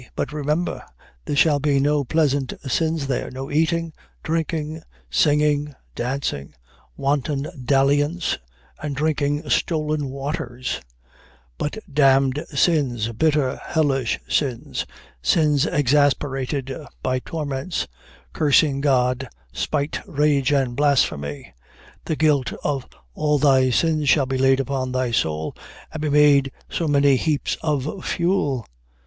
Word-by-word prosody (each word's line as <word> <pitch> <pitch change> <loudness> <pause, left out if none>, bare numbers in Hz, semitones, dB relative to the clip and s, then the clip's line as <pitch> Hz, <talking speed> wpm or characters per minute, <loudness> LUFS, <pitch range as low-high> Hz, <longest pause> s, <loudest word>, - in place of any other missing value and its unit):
But, 140 - -3
remember, 150 +4 -1 0.4
there 145 - -2
shall 145 0 +4
be 140 -1 +2
no 145 +1 +2
pleasant 140 -2 +1
sins 160 +3 0
there; 135 -2 -2
no 135 +1 -7
eating, 165 +1 +1 0.3
drinking, 160 -1 -2 0.3
singing, 150 -1 +2 0.2
dancing; 120 - -3 0.4
wanton 140 0 0 0.2
dalliance, 145 +5 +2 0.4
and 150 -2 -3
drinking 145 0 0
stolen 155 -3 0
waters; 130 -2 -4 0.8
but 150 +8 -2 0.2
damned 135 0 +3
sins, 130 -7 +1
bitter, 145 +1 +1
hellish 135 -7 0
sins; 130 -6 -1 0.3
sins 150 - +3
exasperated 135 -1 +1 0.3
by 130 0 0
torments; 145 +2 -3 0.5
cursing 145 -1 +3
God, 130 -2 +1 0.2
spite, 145 - -1
rage, 145 -2 +2
and 135 -4 +1
blasphemy. 120 - 0 0.5
The 160 - -1
guilt 145 -5 +2
of 140 -3 -2 0.3
all 150 - +1
thy 135 -2 +4
sins 155 +2 +1
shall 140 -2 +4
be 130 0 -2
laid 135 0 +4
upon 135 -2 -2
thy 130 -1 0
soul, 80 -7 -1 0.4
and 160 - -5
be 155 - 0
made 145 -2 +5 0.2
so 165 - -1
many 140 -2 +4
heaps 150 +1 0
of 150 +3 -2
fuel.... 170 - 0
145 Hz, 115 wpm, -22 LUFS, 135-150 Hz, 0.8 s, made